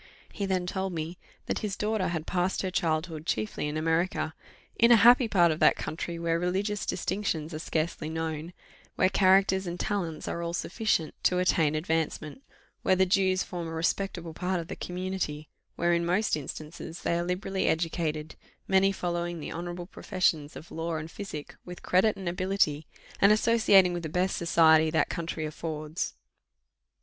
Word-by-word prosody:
He 200 - -3
then 185 -2 0
told 190 0 -2
me 165 +2 -5 0.3
that - - -2
his 205 -3 -3
daughter 210 -2 0
had 165 -2 -3
passed 185 +1 0
her 185 - -2
childhood 160 -1 -1
chiefly 110 +4 -1
in 150 +1 -3
America, 165 +1 0 0.4
"in 235 +1 +5
a - - +10
happy 240 +3 +7
part 175 -6 +4
of 155 - -3
that - - +5
country, 170 +1 -4
where 165 0 0
religious 195 +4 -1
distinctions 175 -4 -2
are 155 - -4
scarcely 155 -1 -2
known 160 0 -4 0.4
where 185 - +3
characters 190 0 +4
and 175 +1 -4
talents 175 -7 -2
are 170 - -3
all 170 0 -3
sufficient 180 -4 0
to 180 - +4
attain 165 -4 +2
advancement 160 - -2 0.4
where 185 - +3
the 190 0 +4
Jews 190 -1 +2
form 175 -2 -5
a - - -6
respectable 170 0 -2
part 180 +2 -1
of 165 - -7
the - - -4
community 180 -4 -4 0.3
where, 175 +1 +2
in 170 0 +1
most 185 +6 +1
instances, 155 +3 -7
they 170 - +1
are - - 0
liberally 185 +2 -1
educated, 160 -2 -1 0.3
many 195 0 +4
following 175 -2 -3
the 150 - -6
honourable 175 +1 -5
professions 165 -5 -1
of 160 - -11
law 165 0 -3
and 160 +1 -5
physic 160 -8 -7
with 180 0 -10
credit 195 +4 +3
and 190 -2 -6
ability, 180 -4 0 0.3
and 200 - +6
associating 215 -4 +5
with 175 - -3
the 160 - -5
best 180 +4 0
society 160 -2 +5
that 160 - +1
country 165 -1 -3
affords. 155 +1 -4
175 Hz, 170 wpm, -28 LUFS, 160-190 Hz, 0.4 s, a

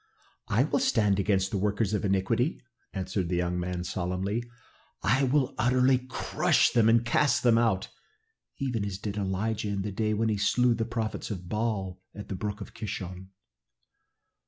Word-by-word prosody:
'" - - -39
"I 110 +5 +3
will 155 - 0
stand 105 -4 +2
against 95 -1 +1
the 100 - -1
workers 105 +1 0
of 105 - 0
iniquity," 100 - +1 0.3
answered 95 -2 -2
the 90 - 0
young 90 0 0
man 90 0 -3
solemnly. 95 +5 -2 0.6
"I 130 +6 +3
will 130 0 +1
utterly 125 +2 +4
crush - - +2
them 115 -2 +4
and 115 +1 +4
cast 120 +3 +2
them 115 -2 +5
out, 110 -5 +1 0.7
even 125 -6 -1
as 100 -2 -3
did 100 0 -5
Elijah 105 +2 -1
in 100 -1 -2
the 105 - -3
day 110 +2 0
when 110 +1 +1
he 105 - 0
slew 125 +3 +3
the 115 -1 -1
prophets 115 -2 -3
of 90 -5 -5
Baal 100 -4 -2
at 105 - -8
the 100 - -3
brook 105 +2 -5
Kishon." 95 -3 -6
105 Hz, 170 wpm, -28 LUFS, 95-115 Hz, 0.7 s, them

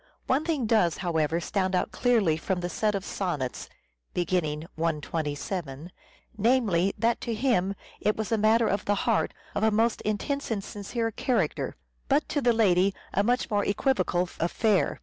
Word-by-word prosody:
One 270 +4 +1
thing 315 -7 0
does, 215 -7 +3
however, 160 -1 +1
stand 185 +2 -1
out - - 0
clearly 225 -10 +2
from 180 +3 -2
the 175 - -2
set 210 +4 0
of 195 0 -3
sonnets 150 -10 -3 0.5
(beginning 160 -3 0
127) 160 0 -3 0.4
namely, 210 -5 +2
that 235 +1 +1
to 230 - -2
him 215 -6 +1 0.2
it 210 - +1
was 220 0 -3
a 225 - +3
matter 220 +2 +4
of 200 - -1
the 205 - +2
heart, 230 -2 +2 0.2
of 205 - -1
a 220 - +4
most 225 +2 +1
intense 280 +7 -2
and 210 -4 -1
sincere 225 +4 -3
character, 250 +3 -1 0.3
but 285 +2 +2
to 290 - 0
the 245 -2 +4
lady 195 -4 +3 0.2
a 200 - +3
much 245 +3 0
more 205 -1 +2
equivocal 200 -5 +1
affair. 195 +4 +1
205 Hz, 165 wpm, -27 LUFS, 175-230 Hz, 0.5 s, matter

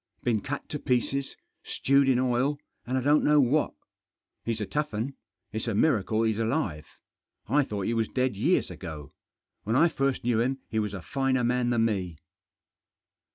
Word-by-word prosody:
Been 115 -4 +1
cut 145 +7 -5
to 150 - -3
pieces, 135 +1 -1 0.2
stewed 140 0 +2
in 130 - +4
oil, 130 +3 +1 0.3
and 130 +2 0
I - - +1
don't 145 +3 +4
know 150 0 +5
what. 145 +3 +2 0.7
He's 115 -1 -2
a 105 - -2
tough 150 -3 -2
'un. 120 +6 -2 0.4
It's 110 +2 -3
a 115 - 0
miracle 110 -4 +2
he's 110 -1 +1
alive. 115 - -1 0.6
I 145 +1 +3
thought 105 -6 -4
he 115 - 0
was 115 -1 +1
dead 130 -3 0
years 145 - +1
ago. 80 -5 -8 0.5
When 110 +3 -1
I 165 +6 +5
first 135 -3 -1
knew 120 -2 +2
him 130 +3 0
he 110 - +1
was 105 -2 -2
a 95 - -7
finer 135 0 0
man 125 0 +1
than 115 -2 +2
me." 95 -7 -2
120 Hz, 180 wpm, -27 LUFS, 110-135 Hz, 0.7 s, know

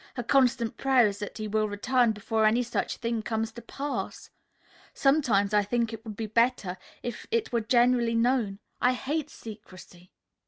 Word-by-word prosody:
Her 245 - -3
constant 245 -2 +2
prayer 265 -3 +4
is 200 -1 -1
that 205 +1 -6
he 215 -1 -4
will 215 0 0
return 240 +3 +2
before 220 +1 0
any 235 +3 +3
such 235 - -2
thing 230 -1 -2
comes 220 0 -2
to 235 - -10
pass. 280 +5 -5 0.6
Sometimes 245 -8 +2
I 210 - +5
think 230 +2 -1
it 225 0 -8
would 220 -3 -7
be 225 - -3
better 220 -4 +1 0.3
if 240 - -6
it 460 -1 0
were 235 - +2
generally 240 0 +3
known. 230 -4 +1 0.2
I 250 - +4
hate 285 +4 -3
secrecy." 185 -5 -12
230 Hz, 170 wpm, -28 LUFS, 215-250 Hz, 0.6 s, I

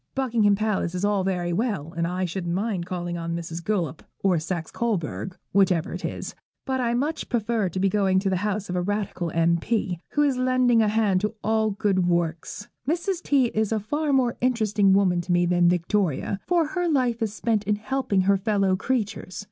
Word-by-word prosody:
Buckingham 230 -6 +2
Palace 205 -4 -1
is 180 +3 0
all 205 -2 +1
very 180 -2 -1
well, 180 - -2
and 170 0 0
I 180 +1 -1
shouldn't 175 -1 -3
mind 195 -3 -2
calling 175 -1 -4
on 165 0 -3
Mrs. 170 0 -5
Guelph, 175 -5 -1 0.2
or 185 -4 +3
Saxe 165 0 -4
Coburg, 190 -4 -2 0.2
whichever 185 -4 +2
it - - -6
is, - - -4 0.3
but 260 -1 -1
I 235 -1 +1
much 290 +6 -2
prefer 225 -4 0
to 185 - -4
be 195 - +3
going 195 -1 +2
to 195 +1 +1
the 185 - +1
house 205 +1 -2
of 180 - -4
a 180 - +1
Radical 195 -3 -2
M.P., 170 +3 0
who 295 - +3
is 275 -3 +1
lending 255 -2 +3
a 215 - +3
hand 210 -3 +2
to 210 +1 -2
all 220 0 +2
good 195 -3 +1
works. 170 +3 -1 0.2
Mrs. 345 +2 -1
T. 270 -7 +2
is 220 0 0
a 220 - +1
far 295 +8 -1
more 255 -3 +2
interesting 215 -5 +2
woman 185 -3 +3
to 175 +1 -4
me 175 0 +3
than 175 0 +3
Victoria, 180 0 0
for 345 -2 +3
her 355 -1 -1
life 250 -6 +1
is 220 -2 0
spent 220 -2 0
in 210 +1 +2
helping 210 -2 0
her 195 +1 +3
fellow 195 -1 +1
creatures. 205 -4 -2
200 Hz, 200 wpm, -25 LUFS, 180-230 Hz, 0.3 s, or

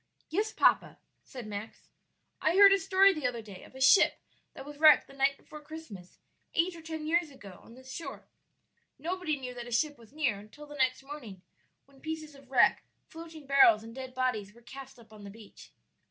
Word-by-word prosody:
"Yes, 420 +6 -1
papa," - - +2 0.3
said 250 -3 -10
Max; 210 +1 -8 0.5
"I 320 +3 +1
heard 395 0 +8
a 395 - +2
story 390 0 +4
the 305 -7 -2
other 235 -2 -5
day 200 -4 -12
of - - -17
a - - -10
ship 265 +8 +5 0.4
that - - -9
was 290 0 -11
wrecked 310 -1 +7
the - - -17
night 275 0 +1
before 305 - -13
Christmas, 295 - -11 0.4
eight 340 +2 +1
or 330 - -11
ten 320 -1 -6
years 335 +1 +1
ago, 200 -9 -13
on 230 - -16
this 260 +1 -12
shore. 335 - -8 0.7
Nobody 340 -1 -3
knew 255 -2 -7
that 240 -1 -8
a - - -9
ship 290 +3 0
was 230 -1 -18
near 275 -9 -1
until 215 +9 -13
the 295 - -12
next 260 -2 0
morning, 245 -10 -10 0.4
when 275 -1 -23
pieces 315 -1 -6
of 275 -2 -18
wreck, 265 - +3 0.3
floating 325 -2 -11
barrels, 270 -6 +5
and 225 0 -11
dead 260 0 -8
bodies 225 -6 -2
were 235 - -19
cast 265 +2 -11
up 225 -2 -18
on 210 -1 -13
the 200 - -9
beach. 210 0 -15
270 Hz, 205 wpm, -30 LUFS, 235-315 Hz, 0.7 s, heard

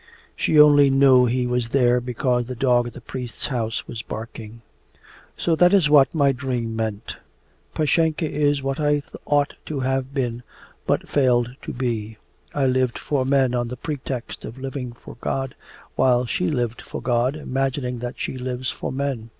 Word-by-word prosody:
She 155 - +2
only 145 -1 +7
knew 135 -2 +5
he 125 +1 0
was 125 -1 -1
there 125 -1 +3
because 125 0 -1
the 125 - -5
dog 120 -1 +2
at 120 - -8
the 125 - -10
priest's 120 -2 -5
house 115 -3 -2
was 115 - -5
barking. 115 0 -8 0.7
'So 165 - +1
that 180 +3 +6
is 160 -7 +3
what 145 +1 +5
my 140 -3 +4
dream 125 -3 -3
meant! 110 -2 -4 0.6
Pashenka 160 +1 +1
is 145 -2 +1
what 135 +1 -2
I 145 -1 +1 0.2
ought 145 0 +2
to 145 -3 -3
have 130 0 -1
been 125 -4 -2 0.5
but - - 0
failed 125 -3 +2
to - - -6
be. 115 -4 -3 0.3
I 140 -2 0
lived 130 -1 +1
for 135 -3 -1
men 135 -2 +3
on 120 -1 0
the 125 +1 -6
pretext 135 -4 -5
of 120 - -8
living 130 -1 -5
for 120 - -13
God, 135 -1 -2 0.4
while 125 -1 +3
she 180 +9 -1
lived 120 -6 -2
for - - -7
God 120 +3 +1
imagining 135 -3 -2
that 120 +1 -5
she 130 - -4
lives 125 0 -3
for - - -5
men. 130 -4 -3
130 Hz, 175 wpm, -23 LUFS, 120-140 Hz, 0.7 s, only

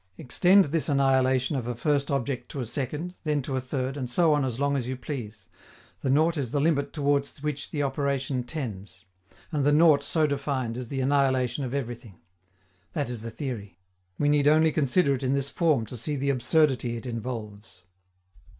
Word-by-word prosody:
Extend 185 +9 +4
this 155 +2 -1
annihilation 130 -1 +2
of 125 -3 -3
a 120 - -2
first 140 +3 0
object 130 -2 -2
to 140 - -6
a 125 - -2
second, 150 +8 -4
then 150 -3 0
to 135 - -3
a 130 - 0
third, 130 +1 -3
and 130 -4 -4
so 165 +4 +3
on 145 -1 +2
as 125 -2 -2
long 140 0 +1
as 125 -3 -2
you 130 0 -3
please: 110 - -7 0.5
the 135 - -1
nought 160 +5 +3
is 135 -5 -2
the 145 - 0
limit 145 -1 +1
toward 140 -2 +1
which 150 -1 -3
the 145 -2 -2
operation 135 -2 -1
tends. 105 -9 -7 0.5
And 150 -3 0
the 145 - +4
nought 150 -1 +5
so 155 +2 +1
defined 140 -5 -2
is 125 -1 -5
the 135 +2 -3
annihilation 130 -1 +1
of 125 +2 -4
everything. 120 -7 -6 0.7
That 145 -5 -2
is 120 -3 -5
the 115 - -5
theory. 115 - -6 0.4
We 145 - +1
need 145 -1 +3
only 155 +1 +5
consider 140 +1 +2
it 130 - -3
in 130 0 0
this 140 0 -1
form 155 -9 +2
to 125 - -8
see 145 +7 -3
the 140 0 0
absurdity 130 -2 +1
it 115 - -9
involves. 110 -5 -6
135 Hz, 195 wpm, -27 LUFS, 125-145 Hz, 0.7 s, nought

